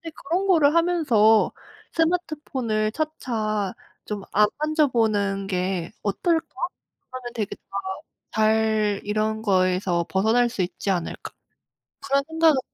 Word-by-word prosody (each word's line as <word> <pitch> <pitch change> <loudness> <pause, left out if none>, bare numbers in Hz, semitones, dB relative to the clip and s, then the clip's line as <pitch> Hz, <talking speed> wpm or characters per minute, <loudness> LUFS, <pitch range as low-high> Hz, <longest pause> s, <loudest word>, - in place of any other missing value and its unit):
그런 355 +7 -1
거를 315 -5 +4
하면서 285 -11 +4 0.4
'스마트폰을 295 -10 0
차차 220 -10 -2 0.3
좀 205 -2 -5
안 210 +1 +5
만져보는 225 -10 +1
게 185 -2 -2
어떨까? 325 - 0 0.6
그러면 250 -2 -7
되게 210 -3 -3
다 - - -40 0.6
잘 215 -1 +2
이런 215 +1 -1
거에서 185 -3 +1
벗어날 225 +5 +3
수 220 - -3
있지 180 +3 -4
않을까.' 175 -3 -3 0.7
그런 275 0 +2
생각을 320 -3 +3
220 Hz, 235 characters per minute, -24 LUFS, 205-305 Hz, 0.7 s, 안